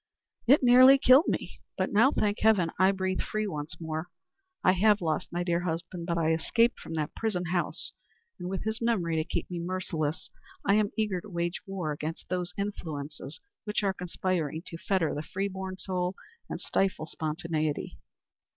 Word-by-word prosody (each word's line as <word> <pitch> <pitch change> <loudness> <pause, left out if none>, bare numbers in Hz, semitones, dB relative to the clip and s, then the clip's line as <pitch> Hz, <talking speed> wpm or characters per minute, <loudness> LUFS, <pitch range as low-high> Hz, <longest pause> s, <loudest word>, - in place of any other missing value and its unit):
"It 275 +3 +6
nearly 255 +2 +9
killed 265 +4 +6
me. - - -3 0.2
But - - -1
now, 230 +7 +6
thank 210 -7 0
heaven, 200 -7 +4
I 190 +1 +6
breathe 190 -1 -1
freely 215 0 -2
once 150 -3 -5
more. 160 0 -4 0.6
I - - +6
have 205 +3 +4
lost 160 -3 -1
my 175 +1 -1
dear 170 -1 +1
husband, 170 0 -4
but 170 -1 0
I 165 -1 +2
have 160 - +2
escaped 235 +8 +2
from 165 - -7
that 150 -2 -2
prison 200 -6 -1
house; 175 -2 -1 0.5
and 180 - -4
with 190 -1 -3
his 220 +1 -2
memory 185 -9 +1
to 155 - +2
keep - - -3
me 175 - -3
merciless, 170 -4 -3 0.3
I 200 - +4
am 210 -1 +3
eager 210 -5 0
to 210 - -12
wage 170 -1 -2
war 185 -5 -3
against 155 +2 -5
those 180 -1 -1
influences 155 -8 -5 0.2
which 210 0 -1
are 195 -1 +2
conspiring 175 -3 -2
to 165 - -7
fetter 185 -5 +1
the 150 - -3
free 195 +5 -2
born 190 -1 -5
soul 180 -1 -2 0.3
and - - -4
stifle 195 -5 0
spontaneity. 155 -1 -3
180 Hz, 180 wpm, -29 LUFS, 165-200 Hz, 0.6 s, nearly